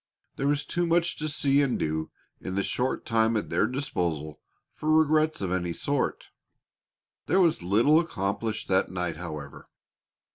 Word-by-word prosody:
There 140 - -1
was 145 0 +1
too 175 0 -1
much 170 0 +2
to 155 0 -2
see 140 -1 +2
and 135 -3 +1
do 80 0 -2 0.3
in 95 - -5
the 100 - +1
short 125 +5 -1
time 115 0 +2
at 105 - -4
their - - +2
disposal 85 - -3 0.3
for 155 - -4
regrets 155 -1 +3
of 95 -2 -2
any 90 -2 -1
sort. 140 +10 -2 1.0
There 190 - +3
was 170 - +3
little 115 - +4
accomplished 110 - -2
that 95 0 +2
night, 90 -3 -3
however. 75 -4 -8
115 Hz, 155 wpm, -27 LUFS, 90-150 Hz, 1.0 s, little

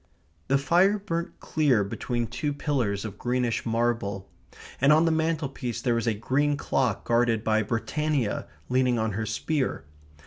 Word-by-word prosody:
The 135 - +3
fire 175 +8 +3
burnt 170 -4 -4
clear 140 -9 +2
between 120 +4 -2
two 145 +5 -3
pillars 125 -9 -1
of 105 -2 -7
greenish 125 -1 -1
marble, 115 -4 -1 0.5
and 140 +2 +6
on 155 +2 +5
the 165 - +3
mantelpiece 155 -6 -1
there 120 - +1
was 115 0 -1
a 115 - +2
green 145 +6 +1
clock 125 -7 0
guarded 115 -2 +2
by 110 -1 +2
Britannia 120 +3 -1 0.2
leaning 125 -1 +2
on 110 -1 0
her 110 +2 -3
spear. 150 - -1
125 Hz, 150 wpm, -26 LUFS, 115-150 Hz, 0.5 s, and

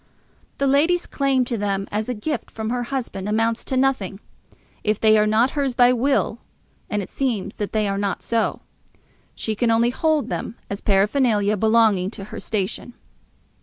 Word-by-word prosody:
The 280 - 0
lady's 315 +6 +3
claim 270 -2 +1
to 235 -3 -3
them 195 -1 -1
as 215 +3 -2
a 250 - -1
gift 300 +9 -3
from 220 0 -4
her 245 0 -1
husband 235 -7 -4
amounts 225 +2 +1
to 260 - -1
nothing. 255 -8 0 0.6
If 215 -1 0
they 220 -1 +5
are 210 0 +4
not 225 +5 +3
hers 275 -4 -1
by 245 0 +5
will, 270 +3 +1 0.5
and 205 -1 -1
it - - -10
seems 245 -8 -2
that 205 - -3
they 215 -1 +1
are 195 0 -1
not 200 -1 -2
so, 230 -2 0 0.7
she 220 - -2
can 230 +2 0
only 230 +1 +3
hold 310 +2 +1
them 220 - -4 0.2
as 200 - -4
paraphernalia 210 +1 +2
belonging 220 -3 +3
to 195 - -7
her - - -5
station. 215 +3 -3
225 Hz, 175 wpm, -22 LUFS, 205-260 Hz, 0.7 s, they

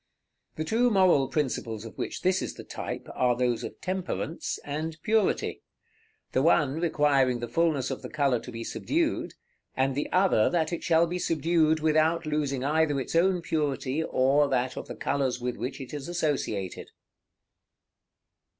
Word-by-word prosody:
The 155 - -2
two 230 +9 +2
moral 185 - +4
principles 120 -6 -2
of 115 - -9
which - - -5
this 185 +1 +2
is - - -4
the - - -9
type, - - -6
are 125 -1 +2
those 120 -1 0
of - - -7
Temperance 180 -3 -3
and 155 +2 -4
Purity; 220 -2 +1 0.7
the 130 - +2
one 150 -1 +3
requiring 145 -6 +2
the 120 - -4
fulness 145 0 +1
of - - -4
the - - -7
color 140 -5 +1
to 125 - -9
be 115 -1 -6
subdued, 320 - -1 0.4
and 135 +1 +2
the 145 +3 -3
other 180 - +4
that 165 -1 0
it 170 - -4
shall 165 0 +4
be 175 +2 -3
subdued 160 -1 +2
without 160 +2 +2
losing 145 -4 -1
either 150 0 +2
its 135 - -4
own 180 +1 +3
purity 150 -2 -1
or 140 +1 +3
that 130 -1 0
of - - -6
the - - -7
colors 135 -3 -1
with 125 0 -3
which 130 +3 -5
it 135 0 -8
is 145 -2 -5
associated. 145 - -2
150 Hz, 165 wpm, -27 LUFS, 130-165 Hz, 0.7 s, moral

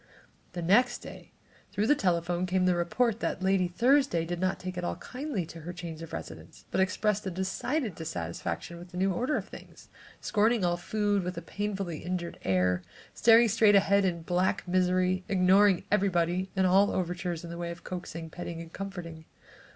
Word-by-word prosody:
The 175 -1 -4
next 240 +8 +3
day - - -11 0.4
through 210 - 0
the 290 - +5
telephone 175 - 0
came 185 0 +1
the 180 - +4
report 210 +7 0
that 190 - -2
Lady 190 -1 +3
Thursday 245 - +2
did 175 +1 -4
not 185 +1 0
take 185 0 -6
at 180 - -4
all - - -2
kindly 255 - -4
to 165 +1 -10
her 165 +2 -6
change 170 -2 -7
of 165 - -8
residence, - - -9
but 190 - +2
expressed 205 +2 +1
a - - 0
decided 190 - -2
dissatisfaction 85 - -5
with 175 +1 -11
the 180 - -9
new 190 +1 +2
order 255 - 0
of - - -5
things, - - -13 0.3
scorning 220 -1 +2
all 175 0 +2
food 205 +3 0
with 180 -1 -5
a - - -3
painfully 195 -3 -3
injured 175 -1 -4
air, 90 -1 +2 0.3
staring 230 +1 +6
straight 215 -1 +4
ahead 200 0 +4
in 170 -3 -1
black 185 +3 0
misery, 185 0 +2
ignoring 190 0 +4
everybody 185 -2 +1
and 190 -1 +2
all 195 +2 +5
overtures 175 -2 -2
in 170 - -7
the 170 - -6
way 170 0 -3
of 170 0 -8
coaxing, 170 -2 -6
petting 170 -1 -6
and 165 0 -10
comforting. 175 -5 -7
185 Hz, 185 wpm, -29 LUFS, 170-200 Hz, 0.4 s, staring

